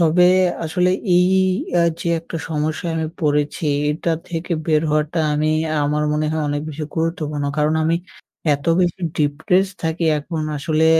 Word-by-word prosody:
তবে 170 +2 +5 0.4
আসলে 180 +3 +1 0.3
এই 180 0 +5 0.5
আ - - +4 0.2
যে 170 - -2
একটা 165 - -7
সমস্যায় 155 +2 -2
আমি 160 -1 -1
পড়েছি, 150 +1 0 0.2
এটা 165 +2 -1 0.2
থেকে 170 +1 -3
বের 155 -1 +3
হওয়াটা 155 +2 0
আমি, 155 +1 +1 0.3
আমার 150 +1 0
মনে 155 0 0
হয় 160 - -1
অনেক 145 0 -1
বেশি 155 0 -5
গুরুত্বপূর্ণ। 160 -3 -2
কারণ 150 +1 +2
আমি 165 +1 +2 0.6
এত 140 - -7 0.2
বেশি 175 0 0 0.2
ডিপ্রেসড 180 +6 +1
থাকি 160 +1 -1
এখন 155 +2 -4
আসলে, 155 +2 +1
155 Hz, 155 wpm, -20 LUFS, 150-170 Hz, 0.6 s, তবে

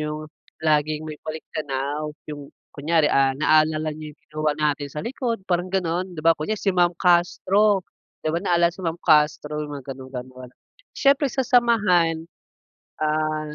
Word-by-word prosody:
Yung 150 0 -4 0.4
laging 155 0 +1
may 155 -1 -8
baliktanaw, 150 -1 -4 0.2
yung 145 -1 -8 0.2
kunyari, 155 +2 +1
ah, 135 -1 +3
naalala 155 +1 +2
niyo 150 0 -9
yung - - -48
ginawa 155 0 0
natin 150 -2 0
sa 150 +2 -6
likod 235 -4 -3
parang 175 0 0
gano'n 180 -1 -2
di 155 - -6
ba, 165 - +7
kunyari 165 +7 -3
si 195 - +1
Ma'am 175 -1 +3
Castro, 185 +3 +3 0.4
di 155 - +1
ba 170 - +1
naalala 175 -3 +2
si 190 - -12
Ma'am 165 -2 -2
Castro 150 0 +3
mga 140 -2 -6
ganon-gano'n, 130 -1 -9 0.5
siyempre 280 0 +3
sa 265 0 -1
samahan, 190 -10 +3 0.7
ah, 155 0 -1
155 Hz, 150 wpm, -23 LUFS, 150-180 Hz, 0.7 s, ba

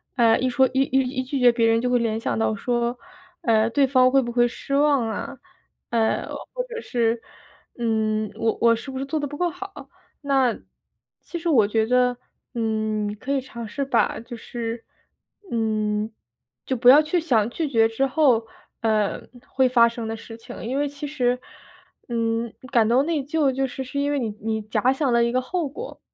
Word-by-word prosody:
哎， 230 -3 +4
一 255 - 0
说 260 +2 +4
一 265 +1 +3
一 265 0 +1
一 260 0 -2
拒 275 +2 -3
绝 245 -1 +6
别 230 -1 +2
人 225 0 +3
就 250 - 0
会 245 -1 +3
联 225 -1 0
想 120 - -2
到 110 -1 +1
说， 240 - -1 0.4
哎， 220 -1 +3
对 275 +4 +3
方 255 -1 +4
会 270 +1 +4
不 240 -1 -4
会 240 0 +3
失 275 +3 -7
望 285 -5 +3
啊？ 270 +5 -5 0.5
哎， 225 -1 +1 0.3
或 - - -2
者 470 -1 -6
是， 230 -1 0 0.6
嗯， 220 -2 0
我 225 -1 0
我 230 0 +6
是 235 +4 -8
不 265 - -5
是 270 - -3
做 310 +3 -2
得 290 - -2
不 290 +1 -8
够 355 -1 +1
好？ 390 +4 -9 0.3
那， 270 -4 +2 0.6
其 345 - -6
实 335 - -5
我 225 -9 +4
觉 220 +1 +1
得， 250 +1 +2 0.4
嗯， 215 -2 -1
可 275 - -4
以 275 - +2
尝 235 -3 -8
试 275 +6 -3
把， 250 -3 +1
就 235 +1 -9
是 230 0 -5 0.7
嗯， 215 -1 -1 0.5
就 260 - -1
不 245 +1 +5
要 285 +3 +9
去 310 +3 0
想 240 -10 +2
拒 315 +3 -2
绝 225 -4 +4
之 245 +5 0
后， 260 -6 +3 0.3
呃， 215 -2 +1 0.3
会 260 -1 +2
发 235 -2 +6
生 230 -1 -5
的 225 0 -4
事 225 0 -10
情， 225 0 -10
因 260 +4 -1
为 290 - +1
其 285 +1 -7
实， 250 -4 0 0.7
嗯， 230 0 -1 0.2
感 230 -4 +4
到 250 +4 +4
内 315 -2 0
疚 295 -1 +1
就 270 +1 -1
是 265 +1 -6
是 280 +2 -4
因 285 +1 0
为 290 - 0
你 235 -4 -2
你 220 0 -2
假 215 +4 +1
想 270 -2 0
了 235 0 +4
一 235 - +1
个 255 - +2
后 315 +3 -2
果。 455 - -8
245 Hz, 215 characters per minute, -23 LUFS, 225-275 Hz, 0.7 s, 要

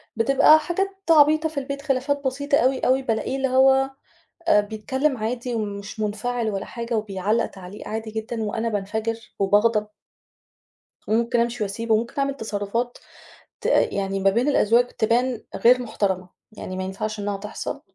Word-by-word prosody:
بتبقى 275 +6 +6
حاجات 350 +5 -1 0.2
عبيطة 310 0 +5
في 305 -3 -3
البيت، 280 +1 -5
خِلافات 280 0 -1
بسيطة 280 +2 +1
أوي، 260 +1 +2
أوي، 260 +1 +2
بالاقيه 245 +2 -1
اللي 270 - +1
هو 265 +1 +4 0.6
آآ 210 -10 +6
بيتكلّم 260 +7 -1
عادي 240 +2 -3
ومش 205 -1 -5
منفعِل 220 +2 -1
ولا 195 -1 -3
حاجة 235 0 -4
وبيعلّق 210 +2 0
تعليق 190 +1 -10
عادي 220 0 -4
جدًا 220 +1 -4
وأنا 220 +2 -2
بانفجر 220 +2 -2 0.2
وباغضب. 210 +2 +3 1.2
وممكن 235 +2 +1
أمشي 235 -1 -1
واسيبه 220 +3 -1
وممكن 230 +2 -1
أعمل 275 0 0
تصرّفات 220 +2 -3 0.6
ت - - -4
يعني 195 0 +1
ما 195 0 +4
بين 235 +7 +1
الأزواج 240 -3 +4
تبان 240 +1 0
غير 250 +2 +5
محترَمة، 190 -5 -2 0.2
يعني 185 -3 -7
ما 185 - -3
ينفَعش 210 +3 -4
إنها 205 0 -2
تحصَل 205 +2 -6
230 Hz, 150 wpm, -23 LUFS, 210-260 Hz, 1.2 s, بتبقى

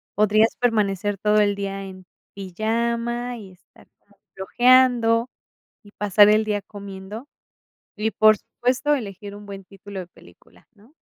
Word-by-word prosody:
Podrías 215 +2 +3
permanecer 205 -4 0
todo 210 +2 +2
el 205 -1 +2
día 195 0 -5
en 185 -1 -11 0.3
pijama, 235 +5 -3
y 195 -4 -12
estar 180 -1 -23
como 200 -1 -30 0.2
flojeando, 240 +2 +3 0.5
y 205 - -17
pasar 205 0 +5
el 215 +1 +3
día 205 -1 -2
comiendo, 200 +5 -10 0.7
y 220 +1 -1
por 215 -1 +5
supuesto 255 +4 -1
elegir 200 -4 -7
un 205 0 -12
buen 195 -1 -9
título 195 0 -10
de 180 - -8
película, 90 - -21
¿no? 220 +8 -23
210 Hz, 140 wpm, -22 LUFS, 195-230 Hz, 0.7 s, pasar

